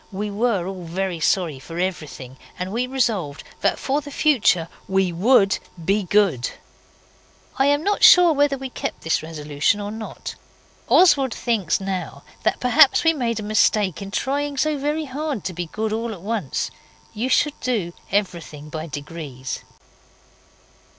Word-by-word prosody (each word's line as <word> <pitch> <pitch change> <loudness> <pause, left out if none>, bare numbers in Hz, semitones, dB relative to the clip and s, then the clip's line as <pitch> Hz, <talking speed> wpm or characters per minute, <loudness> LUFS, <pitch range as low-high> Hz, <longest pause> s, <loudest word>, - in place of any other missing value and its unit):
We 205 +2 -3
were 205 -3 0
all 185 -1 -6
very 180 +1 -3
sorry 160 -4 +1
for 165 +5 -9
everything, 155 -8 -4 0.2
and 185 +1 -4
we 240 +4 -1
resolved 220 - -1 0.2
that - - +1
for 280 +2 -1
the 290 - -9
future 250 - +2 0.2
we 190 -2 +1
WOULD 195 +2 +4 0.3
be 200 +4 +2
good. 180 - +2 1.1
I 270 - +4
am 290 +2 +2
not 410 +2 0
sure 355 -2 +8
whether 285 -1 +2
we 265 -1 -6
kept - - -5
this 160 - +1
resolution 150 +3 -1
or 205 0 -4
not. 220 0 -7 0.6
Oswald 275 -9 +5
thinks 215 -9 0
now 195 -1 -4 0.2
that - - 0
perhaps 250 +2 +5
we 325 0 +4
made 235 -6 -1
a - - -5
mistake 210 -2 +2
in 195 - -6
trying 280 +6 -2
so 310 +2 +1
very 295 +2 -1
hard 285 - -4
to 185 - -4
be 175 0 -4
good 215 +5 -3
all 225 +1 -2
at 185 - -10
once. 205 - -2 0.4
You 235 +5 -2
should 295 +2 +2
do 210 -9 -1 0.2
everything 170 -7 -2
by 155 +1 -5
degrees. 145 -4 -6
205 Hz, 155 wpm, -22 LUFS, 170-260 Hz, 1.1 s, sure